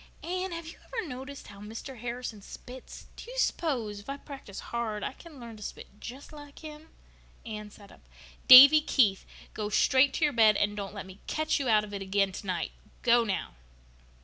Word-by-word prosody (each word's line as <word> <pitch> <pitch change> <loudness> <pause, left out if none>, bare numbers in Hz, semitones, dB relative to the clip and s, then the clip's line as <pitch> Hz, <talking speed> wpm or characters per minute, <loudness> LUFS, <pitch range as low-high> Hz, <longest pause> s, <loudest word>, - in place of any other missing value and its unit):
"Anne, 370 +2 -3
have 335 -1 -6
you 325 - -11
ever 455 -7 -5
noticed 270 +1 -8
how 200 -1 -12
Mr. 225 +5 -8
Harrison 235 -2 -5
spits? 250 +5 -11
Do - - -10
you - - -8
s'pose, 245 - -1
if 205 - -13
I 275 - -4
practice 275 -9 -10
hard, 225 -3 -4
I - - -3
can 310 -1 -14
learn 230 -2 -10
to - - -14
spit 205 0 -9
just 265 +5 -9
like 290 -1 -12
him?" 305 +1 -10 0.6
Anne 210 -2 -7
sat 200 -1 -16
up. - - -20 0.4
"Davy 280 +4 +11
Keith," 215 -10 +2
she - - -17
said, - - -27
"go 210 -1 -3
straight 260 +6 +4
to - - -1
your 295 -1 +3
bed 220 -3 +5
and 205 0 0
don't 200 0 -6
let 200 - -6
me 190 0 -13
catch 310 -1 0
you 265 -3 -1
out 215 -1 +4
of 205 -1 -9
it 200 - -4
again 195 0 +1
tonight! 185 -3 -4 0.3
Go, 240 0 +5
now!" 205 -4 -3
235 Hz, 205 wpm, -29 LUFS, 210-285 Hz, 0.6 s, Davy